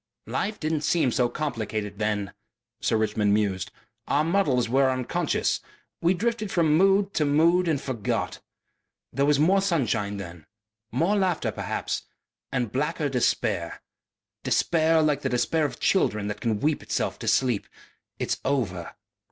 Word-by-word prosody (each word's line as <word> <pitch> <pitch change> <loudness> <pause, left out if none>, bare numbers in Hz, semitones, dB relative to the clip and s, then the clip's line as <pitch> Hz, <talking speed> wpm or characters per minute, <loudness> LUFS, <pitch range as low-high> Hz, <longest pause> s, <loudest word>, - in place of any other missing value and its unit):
"Life 210 +2 -2
didn't 155 -1 -1
seem 155 -4 +2
so 120 0 +2
complicated 110 -9 -3
then," 105 -2 -1 0.5
Sir - - +1
Richmond 105 -1 +1
mused. 100 -4 -1 0.4
"Our 150 - +2
muddles 155 -9 +2
were 135 +3 +3
unconscious. 130 -1 0 0.4
We 175 +2 +3
drifted 220 +2 -1
from 160 -3 +3
mood 195 +3 +3
to 155 - +1
mood 165 +5 +3
and 155 -4 +1
forgot. 120 -7 -3 0.7
There 140 +3 +1
was 150 -1 +4
more 185 +7 +4
sunshine 115 - 0
then, 85 -4 -9 0.4
more 165 - +1
laughter 185 -4 +1
perhaps, - - -3 0.5
and 125 -5 -1
blacker 150 +3 -1
despair. 105 -8 -1 0.6
Despair 160 -1 +3
like 150 -2 +1
the 135 - -1
despair 150 +6 +1
of 130 -5 -5
children 105 - +1
that 105 0 -5
can 110 -3 -1
weep 150 0 +1
itself - - -2
to - - -6
sleep.... 125 -6 +2 0.5
It's - - -2
over.... 105 -11 -2
135 Hz, 145 wpm, -26 LUFS, 110-165 Hz, 0.7 s, was